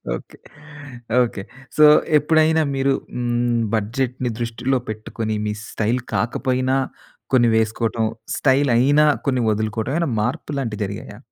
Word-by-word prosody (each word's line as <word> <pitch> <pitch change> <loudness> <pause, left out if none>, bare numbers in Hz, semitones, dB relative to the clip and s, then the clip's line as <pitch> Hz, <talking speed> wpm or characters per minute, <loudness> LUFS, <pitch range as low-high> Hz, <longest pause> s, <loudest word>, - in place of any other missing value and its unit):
Okay. - - -11 0.9
Okay. 110 -4 -4 0.4
So, 155 - +8 0.3
ఎప్పుడైనా 155 +2 +3
మీరు 135 0 +2 0.2
హ్మ్, 120 -1 0
బడ్జెట్‌ని 125 +3 -2
దృష్టిలో 120 +3 -1
పెట్టుకొని 110 0 -4
మీ 105 - -1 0.2
స్టైల్ 115 +4 0 0.2
కాకపోయినా 130 +2 0 0.6
కొన్ని 120 -2 +5
వేసుకోవటం. 110 0 0 0.3
స్టైలైనా 140 +2 +3 0.2
కొన్ని 130 -3 +1
వదులుకోవడం 110 +4 -2
ఏమైనా 170 -4 0
మార్పులాంటి 125 0 -3
జరిగాయా? 105 +1 -7
120 Hz, 105 wpm, -21 LUFS, 110-135 Hz, 0.9 s, So